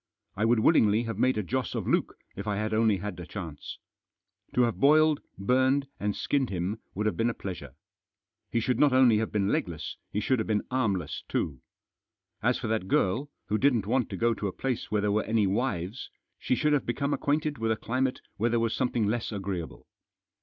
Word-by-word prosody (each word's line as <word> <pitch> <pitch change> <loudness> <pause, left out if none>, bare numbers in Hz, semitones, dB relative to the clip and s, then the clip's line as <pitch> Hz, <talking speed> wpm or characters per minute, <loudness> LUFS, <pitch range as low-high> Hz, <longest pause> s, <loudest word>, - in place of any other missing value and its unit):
I 110 - +1
would 115 -1 +3
willingly 110 -6 +4
have 115 -3 -4
made 130 -1 +3
a 105 - 0
Joss 130 +5 -2
of - - -2
Luke - - +1 0.2
if 100 +2 -6
I 105 - 0
had 110 +2 -2
only 110 -2 +3
had 100 +1 -5
a 85 - -6
chance. 85 -8 -7 0.8
To 125 - +5
have 120 -1 0
boiled, 155 +1 +5 0.2
burned, 130 +6 +2
and 105 0 -1
skinned 140 -3 0
him 95 +4 -2 0.2
would 105 +3 -1
have 110 - +1
been 115 +1 +1
a 115 - -3
pleasure. 85 -9 -7 0.7
He 115 - +1
should 120 +1 0
not 145 -3 +5
only 125 -4 +5
have 110 - -2
been 100 -2 +1
legless, 85 -6 -2
he 105 - -1
should 130 +3 +1
have 110 - -2
been 105 -2 0
armless 100 - -1
too. 70 -5 -2 0.8
As - - +2
for - - -6
that 110 -4 -1
girl, 115 +11 +1 0.2
who 105 +1 0
didn't 125 -7 +3
want 125 +4 +1
to - - -5
go 115 0 +2
to 105 - -3
a - - -2
place 130 +4 -3
where 105 -1 +1
there 105 0 +1
were 105 +1 +1
any 110 -2 +2
wives, 100 0 -2 0.3
she - - +1
should 150 +3 +2
have 145 - +1
become 140 +4 0
acquainted 150 -2 0
with 115 0 0
a 110 - +1
climate 130 +4 -1 0.2
where 115 +4 +1
there 120 0 +2
was 115 0 0
something 120 -4 0
less 115 +3 -1
agreeable. 95 -5 -5
110 Hz, 210 wpm, -28 LUFS, 100-130 Hz, 0.8 s, To